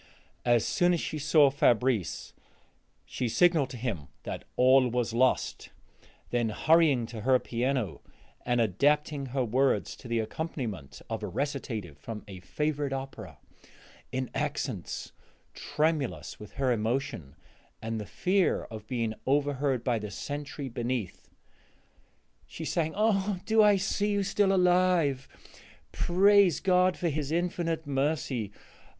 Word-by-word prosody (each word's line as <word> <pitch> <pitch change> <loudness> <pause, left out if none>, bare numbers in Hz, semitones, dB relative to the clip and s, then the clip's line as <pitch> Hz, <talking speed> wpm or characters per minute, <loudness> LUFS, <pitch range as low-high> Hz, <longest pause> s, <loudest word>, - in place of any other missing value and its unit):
As 120 -3 +3
soon 175 0 +2
as - - -2
she 155 - -4
saw 150 -1 +5
Fabrice 125 - +1 0.7
she 125 - -3
signaled 165 -1 +3
to 130 - -7
him 110 - -4 0.2
that - - -6
all 130 +1 +5
was 120 -1 -1
lost; 130 +2 +1 0.6
then, 120 -2 +1
hurrying 150 0 +3
to 115 -1 -8
her 130 +3 +4
piano, 120 - -2 0.4
and 120 -1 +1
adapting 140 - +1
her 130 0 -1
words 130 +4 +1
to 130 - -11
the 115 0 -1
accompaniment 110 - -5
of - - -4
a - - -3
recitative 115 - -4
from 105 +7 -7
a 95 -2 -9
favorite 145 +8 -2
opera, 115 - -7 0.7
in 130 -1 -3
accents - - -3 0.4
tremulous 150 -3 -2
with 105 - -11
her 135 -2 0
emotion 115 - -2 0.4
and 115 0 -4
the 105 - -8
fear 190 0 +1
of 110 -1 -8
being 115 -3 -1
overheard 140 -2 +1
by 120 -3 +1
the 105 0 -6
sentry 145 +6 -5
beneath, 120 -4 -4 1.2
she - - -7
sang: 160 -2 -1
"Ah, 205 -3 +1
do 220 0 +4
I 210 -1 +6
see 200 +2 0
you 200 0 +1
still 200 0 +2
alive? 180 -7 +3 0.6
Praise 195 -1 +4
God 185 -1 +3
for 175 - 0
his 150 -1 -3
infinite 165 -1 -1
mercy! 135 -6 -1
135 Hz, 130 wpm, -29 LUFS, 115-160 Hz, 1.2 s, I